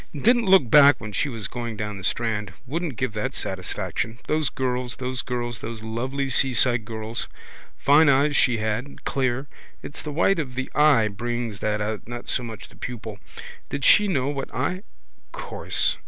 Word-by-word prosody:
Didn't 240 - +3
look 190 -9 +6
back 145 +3 +7
when 110 0 -7
she 125 +8 0
was 115 -7 -4
going 120 -3 -5
down 105 -1 -4
the - - -10
strand. 105 -3 -1
Wouldn't 155 +1 -3
give 130 -1 -2
that 105 -1 -3
satisfaction. 115 +1 -3
Those 155 -2 +1
girls, 125 -1 -2
those 130 -1 -3
girls, 120 -2 -3
those 115 -1 -6
lovely 130 +5 -2
seaside 125 -3 +3
girls. 110 0 -4 0.5
Fine 145 +2 +5
eyes 140 +2 +3
she 125 -4 +3
had, 110 +5 -3
clear. 130 0 0 0.4
It's 145 - -8
the 150 - -5
white 170 +5 +2
of 130 -5 -4
the 130 0 -3
eye 145 -7 +5
brings 115 0 -3
that 105 0 -1
out 105 0 -3
not 120 0 -7
so - - 0
much 115 -3 -8
the - - -18
pupil. 110 -4 -6 0.5
Did 140 0 -2
she 210 -1 +6
know 140 -8 0
what 140 -2 -4
I? 160 +9 -2 0.5
Course. - - -1
125 Hz, 175 wpm, -24 LUFS, 110-140 Hz, 0.5 s, back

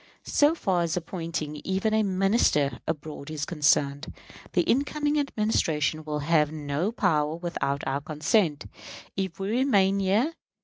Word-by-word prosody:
So 295 +3 +3
far 185 - 0
as 170 0 -1
appointing 165 -3 -4
even 190 +7 -1
a 220 - +3
Minister 190 - +2
abroad 155 -2 -5
is 155 -2 -3
concerned, 145 -2 +1 0.4
the 175 - +3
incoming 295 - +1
Administration 165 - 0
will 150 -1 -3
have 150 0 +2
no 150 +5 -2
power 155 -9 +1
without 165 -5 -2
our 135 +1 -1
consent, 155 +1 0 0.5
if 190 -2 -3
we 195 +2 -2
remain 200 -6 +3
here. 210 +11 +1
170 Hz, 135 wpm, -26 LUFS, 150-205 Hz, 0.5 s, So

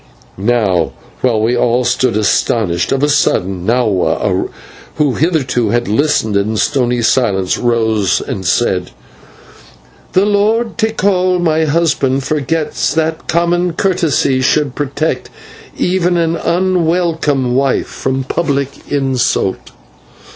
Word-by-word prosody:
Now, 100 -5 0 0.3
while 115 -1 +1
all 120 +1 +2
stood 120 -2 +1
astonished, 100 -3 0
of 135 +1 0
a - - +4
sudden 95 -10 0
Nahua, 100 -6 0 0.5
who 145 -4 +1
hitherto 135 - 0
had 120 +2 0
listened 110 -2 +1
in 105 +2 0
stony 125 -2 0
silence, 100 -6 +1
rose 110 -5 +1
and 95 - -5
said: 90 -1 0 1.2
"The 190 +2 +3
Lord 215 +2 +1
Tikal, 195 -4 +1
my 160 -2 +1
husband, 145 -4 +1
forgets 150 +1 -1
that 160 0 -1
common 175 +1 +1
courtesy 165 -8 +1
should 140 0 +1
protect 145 +3 -2 0.5
even 180 -1 +1
an 165 -1 +1
unwelcome 165 -7 0
wife 135 0 +1
from 130 0 -3
public 140 -1 -3
insult." 130 -8 0
135 Hz, 110 wpm, -14 LUFS, 115-165 Hz, 1.2 s, a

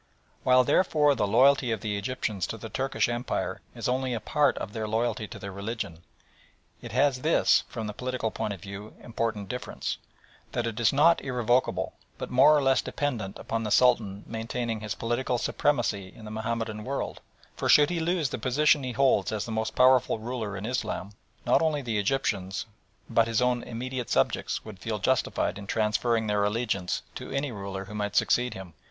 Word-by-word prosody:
While, 130 0 +5
therefore, 150 -1 +3
the 105 -6 0
loyalty 125 +3 +4
of 110 -3 -2
the 105 -2 -2
Egyptians 100 -3 -2
to 115 - -5
the 110 +1 -8
Turkish 135 +3 0
Empire 120 +1 -2
is - - -3
only 130 0 0
a - - -2
part 145 +7 +2
of 100 - -5
their 110 -1 -3
loyalty 110 0 -1
to - - -9
their 100 - -7
religion, 100 -4 -5 0.8
it - - -8
has 140 -3 +2
this, 160 +4 +3
from 115 -2 -5
the 105 - -4
political 125 -1 -2
point 105 - -3
of 95 - -10
view, 100 +2 -9
important 115 -3 -2
difference 125 +5 -4 0.5
that 120 -1 -1
it 115 -1 -3
is 115 - +4
not 160 +4 +5
irrevocable, 125 -1 0 0.2
but - - -6
more 140 +4 +6
or 145 - +1
less 135 0 +4
dependent 115 -9 -3
upon 115 - -3
the 110 - -2
Sultan 110 -4 +3
maintaining 115 0 -3
his 105 -1 -4
political 120 +2 -1
supremacy 115 -6 0
in 110 - -12
the 105 - -7
Mahomedan 110 -1 -3
world, 135 +3 -4 0.3
for - - -2
should 150 +2 +6
he 175 - -1
lose 165 -3 0
the - - -4
position 145 +3 +3
he 125 -1 -3
holds 120 -7 +3
as 110 -2 -2
the 115 - -6
most 110 0 -2
powerful 130 -2 +5
ruler 110 -3 -4
in 100 - -5
Islam, 115 -5 -3 0.3
not - - +4
only 155 -3 +1
the 115 -4 -1
Egyptians, 100 -5 -1 0.4
but 115 -1 +3
his 115 -1 +1
own 125 -1 +2
immediate 125 +1 -5
subjects, 65 - 0
would 105 -3 -9
feel 110 +1 -3
justified 105 -3 0
in 100 - -9
transferring 110 +2 +1
their 105 -1 +1
allegiance 105 -4 -1
to - - -7
any 140 0 -2
ruler 100 -2 -5
who 100 - -10
might 105 -1 -3
succeed 125 0 +2
him. 95 -3 -9
115 Hz, 190 wpm, -27 LUFS, 105-130 Hz, 0.8 s, more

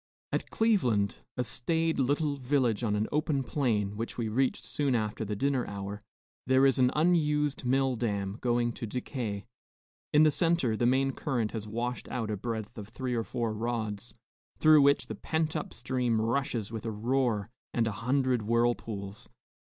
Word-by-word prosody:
At - - -2
Cleveland, 125 - +2 0.2
a 125 - +1
staid 160 +7 0
little 145 +2 +1
village 125 -4 +1
on 105 -3 +1
an 105 +1 0
open 150 -2 +1
plain, 110 -7 0
which 115 +1 -4
we 115 -2 -1
reached 130 +4 0
soon 140 -4 0
after 110 -1 -1
the 105 0 -3
dinner 135 +2 +1
hour, 100 +1 -5 0.5
there 130 +1 +5
is 135 -1 +3
an 125 -1 +5
unused 150 -4 +2
mill 135 +1 +2
dam 100 -3 -2
going 120 -1 +1
to 115 - -6
decay. 115 -3 -4 0.7
In 150 +1 +6
the 155 - +5
centre, 165 -8 +2
the 120 +2 +2
main 135 +2 +3
current 125 -5 -2
has 110 -2 -5
washed 120 +3 -3
out 115 -4 -2
a - - 0
breadth 110 +1 -4
of 100 - -7
three 125 +2 -3
or 115 -1 0
four 115 -2 -2
rods, 110 -1 -3 0.4
through 155 -1 +7
which 140 0 +4
the - - -6
pent 160 0 -1
up 155 - -3
stream 125 -2 0
rushes 115 -2 -1
with 115 0 -5
a - - -1
roar 115 -1 0 0.2
and 115 - +1
a 110 - 0
hundred 130 0 +2
whirlpools. 110 -3 -1
120 Hz, 175 wpm, -30 LUFS, 110-135 Hz, 0.7 s, through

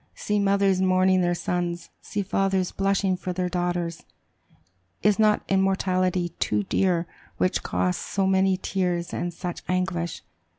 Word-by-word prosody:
See 210 0 -1
mothers 200 -1 +2
mourning 185 0 +3
their 175 0 +1
sons! 175 -1 -3
See 205 - -3
fathers 195 -1 0
blushing 195 -1 +1
for 180 0 -4
their 180 0 -1
daughters! 175 -2 -2 1.0
Is 210 0 +3
not 215 -1 +4
immortality 185 -2 +1
too 105 -1 +1
dear 175 - +1 0.3
which 185 - +1
costs 90 0 -1
so 195 -1 -1
many 190 0 +3
tears 180 -2 -2
and 175 - -2
such 175 +1 -6
anguish? 180 -2 -1
185 Hz, 135 wpm, -25 LUFS, 175-195 Hz, 1.0 s, not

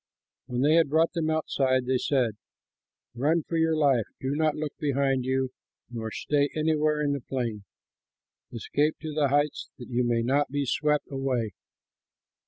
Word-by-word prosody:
When 125 -1 -2
they 150 +4 +4
had 165 -4 +4
brought 160 +4 +2
them 165 -3 -1
outside, 135 -5 +1
they 130 0 +1
said, 125 -5 +1 0.8
"Run 150 +7 +1
for 165 - -5
your 160 0 +2
life; 135 -7 +3
do 130 0 -2
not 155 0 +1
look 150 -1 -4
behind 135 -3 +1
you 130 0 0 0.4
nor 115 -2 -4
stay 145 +5 0
anywhere 155 -1 +1
in 145 -1 +1
the 140 - -3
plain. 115 -5 -4 0.9
Escape 145 +6 0
to 155 -1 -5
the 145 -1 +2
heights, 145 +2 0
that 120 - -10
you 125 0 +1
may 120 -1 +1
not 140 +4 +1
be 145 +1 -1
swept 150 +3 +1
away!" 130 -5 -1
140 Hz, 165 wpm, -27 LUFS, 125-150 Hz, 0.9 s, they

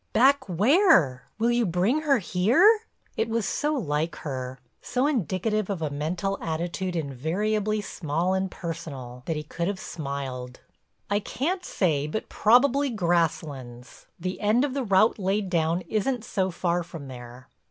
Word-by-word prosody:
"Back 270 -1 +4
where? 180 - +4
Will 230 +2 +2
you 240 0 +2
bring 195 - +1
her 290 -3 +3
here?" 265 - +4 0.3
It 225 +1 0
was 225 -2 0
so 300 +1 0
like 160 - -1
her—so 130 - -4
indicative 215 - 0
of 185 -5 -2
a 150 - -1
mental 170 +7 -2
attitude 175 +3 -3
invariably 195 - -1
small 170 -1 -1
and 190 0 0
personal, 150 -9 -7
that 165 - 0
he 150 - -3
could 170 +3 -3
have 200 -1 -2
smiled: 140 -6 -5 0.5
"I 205 - +3
can't 340 - -2
say, 150 - 0
but 220 +8 -4
probably 270 +5 +4
Grasslands. 160 - -2
The 185 +2 -4
end 220 +6 +3
of 275 - -3
the 275 -1 -1
route 210 +1 +3
laid 195 0 0
down 165 0 +1
isn't 220 +6 -1
so 190 -4 0
far 175 0 0
from 165 -4 -9
there." 125 0 -10
185 Hz, 150 wpm, -26 LUFS, 155-220 Hz, 0.5 s, Back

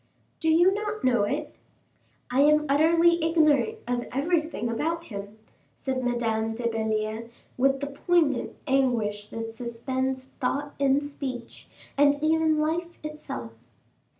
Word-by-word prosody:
"Do 325 - +1
you 345 +4 +5
not 425 +1 -3
know 240 -5 +3
it?" - - -3 0.8
"I 255 - +1
am 300 +1 +5
utterly 330 +4 +4
ignorant 325 +6 +3
of 245 0 -1
everything 315 0 0
about 325 +9 -1
him," 205 -4 -8 0.4
said 260 -1 -3
Madame 225 -2 0
de 240 - -6
Belliere, 220 0 -2 0.3
with 270 +2 +2
the - - -1
poignant 285 -1 +1
anguish 235 -7 +1
that 225 +1 -5
suspends 260 +3 -3
thought 280 +2 -3
and 280 +1 +2
speech, 260 -4 -7 0.3
and 285 0 +6
even 315 0 +2
life 335 +3 -1
itself. 300 - -6
275 Hz, 125 wpm, -26 LUFS, 235-315 Hz, 0.8 s, and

